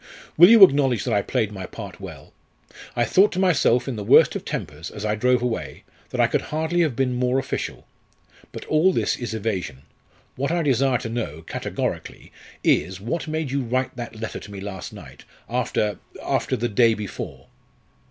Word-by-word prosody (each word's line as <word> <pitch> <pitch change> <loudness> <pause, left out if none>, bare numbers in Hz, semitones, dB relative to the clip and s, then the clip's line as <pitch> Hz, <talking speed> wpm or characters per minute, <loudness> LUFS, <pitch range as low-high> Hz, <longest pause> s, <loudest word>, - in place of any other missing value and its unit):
"Will 175 +4 +8
you 225 -3 +9
acknowledge 135 - +5
that 120 - -1
I 100 - +3
played 110 -1 -1
my 95 -3 -7
part - - -9
well? - - -10 0.6
I 120 - +2
thought 200 - +4
to 185 - -2
myself, 145 -10 +3
in 130 -4 -3
the 105 - -4
worst - - +6
of - - -4
tempers, 75 +3 -5
as 105 0 -7
I 105 - +1
drove 125 +3 +2
away, 120 -2 -3 0.3
that - - -5
I - - +6
could - - 0
hardly 160 +3 -1
have 155 -8 +1
been 130 -1 0
more 125 +1 +1
official. 135 - -4 0.7
But - - -8
all 155 +5 +3
this - - +1
is 120 -2 -5
evasion. 95 -11 -3 0.5
What 140 +2 -1
I 170 0 0
desire 135 -2 +2
to 115 -1 -6
know, 80 -10 -4
categorically, - - -5 0.3
is, 95 0 +2
what 120 - -3
made 155 -3 -2
you 140 0 0
write 130 +2 -1
that 120 -2 -7
letter 115 - -5
to 105 - -12
me 100 - -7
last 95 -2 -7
night, - - -12 0.2
after 105 -1 -1 0.2
after - - 0
the 120 - -1
day 115 +1 +3
before?" 105 -3 -7
125 Hz, 190 wpm, -23 LUFS, 105-140 Hz, 0.7 s, you